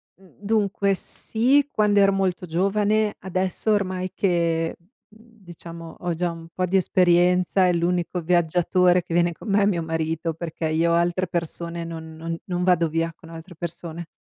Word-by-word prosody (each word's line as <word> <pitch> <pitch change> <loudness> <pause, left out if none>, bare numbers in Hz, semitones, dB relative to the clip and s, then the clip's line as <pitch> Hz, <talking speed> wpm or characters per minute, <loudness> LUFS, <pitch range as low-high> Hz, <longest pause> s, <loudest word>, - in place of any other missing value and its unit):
mhmm, 190 -1 -22
dunque 200 -2 +1
sì, 265 +9 +1
quando 210 -1 +3
ero 195 0 +5
molto 190 -2 -1
giovane. 205 +5 +1
Adesso 190 +3 -1
ormai 185 -2 -1
che, 170 -3 0
mhmm, 210 +3 -26 0.2
diciamo 170 -1 -10
ho 175 -1 -2
già 175 +1 -1
un 165 0 -10
po' 185 - 0
di 190 +2 +2
esperienza, 180 0 +3
e 180 - +2
l'unico 175 +1 -1
viaggiatore 175 +1 +2
che - - -7
viene 170 0 +2
con 210 - -10
me 200 +1 +3
è - - +4
mio 175 -5 +1
marito, 160 0 -2
perché 165 0 -4
io 165 +2 +2
altre 175 +2 +1
persone, 170 0 -3
non 160 -1 -8
non 165 +1 -5
non 180 -1 -2
vado 175 -2 +3
via 165 +1 -1
con 165 - -16
altre 165 +2 -11
persone. 170 0 -7
175 Hz, 170 wpm, -23 LUFS, 165-190 Hz, 0.2 s, ero